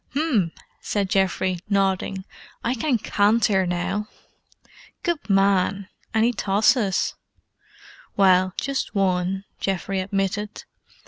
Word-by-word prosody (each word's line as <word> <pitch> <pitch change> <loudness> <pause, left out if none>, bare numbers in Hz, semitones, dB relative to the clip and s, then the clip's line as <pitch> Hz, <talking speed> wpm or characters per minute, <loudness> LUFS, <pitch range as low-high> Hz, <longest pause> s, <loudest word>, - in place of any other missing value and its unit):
"'M!" 255 - +1 0.3
said 200 -2 -2
Geoffrey, 190 -1 +1
nodding. 195 -1 0 0.4
"I 235 - +1
can 260 +1 +1
canter 205 -2 +2
now!" 185 +4 -2 1.0
"Good 345 - -2
man! 195 0 +2 0.2
Any 225 +2 +2
tosses?" 205 0 +2 1.0
"Well, 185 -1 +4
just 275 -4 -2
one," 190 0 0 0.2
Geoffrey 195 0 -2
admitted. 195 +2 -2
195 Hz, 90 wpm, -23 LUFS, 190-215 Hz, 1.0 s, Well